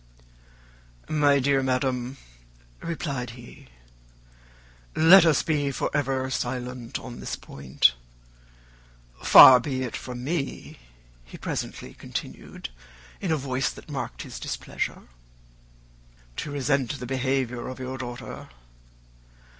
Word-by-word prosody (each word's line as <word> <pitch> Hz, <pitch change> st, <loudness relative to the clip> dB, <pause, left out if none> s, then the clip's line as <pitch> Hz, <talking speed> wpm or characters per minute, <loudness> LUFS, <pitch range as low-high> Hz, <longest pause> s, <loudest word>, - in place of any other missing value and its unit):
"My 145 Hz, -2 st, +4 dB
dear 135 Hz, 0 st, +2 dB
madam," 130 Hz, 0 st, -1 dB, 0.6 s
replied 140 Hz, -7 st, -3 dB
he, 120 Hz, -, -13 dB, 1.3 s
"let 170 Hz, +2 st, +8 dB
us 155 Hz, -4 st, +3 dB
be 145 Hz, -3 st, 0 dB
for 135 Hz, -, -2 dB
ever 135 Hz, -2 st, 0 dB
silent 125 Hz, -1 st, -3 dB
on 120 Hz, -2 st, -9 dB
this -, -, -4 dB
point. 65 Hz, -2 st, +1 dB, 1.3 s
Far 130 Hz, -1 st, +10 dB
be 130 Hz, 0 st, -3 dB
it 125 Hz, -, -4 dB
from 125 Hz, -1 st, -6 dB
me," 140 Hz, -, -4 dB, 0.4 s
he -, -, -12 dB
presently -, -, -5 dB
continued, -, -, -7 dB, 0.5 s
in 185 Hz, -, -2 dB
a 160 Hz, -, +2 dB
voice 130 Hz, -2 st, -1 dB
that -, -, -11 dB
marked -, -, -5 dB
his -, -, -8 dB
displeasure, -, -, -4 dB, 1.3 s
"to -, -, -4 dB
resent 140 Hz, -1 st, 0 dB
the 125 Hz, -, -5 dB
behaviour 130 Hz, -1 st, -1 dB
of 130 Hz, -1 st, -6 dB
your 130 Hz, 0 st, -5 dB
daughter. 120 Hz, -1 st, -7 dB
130 Hz, 110 wpm, -26 LUFS, 125-140 Hz, 1.3 s, Far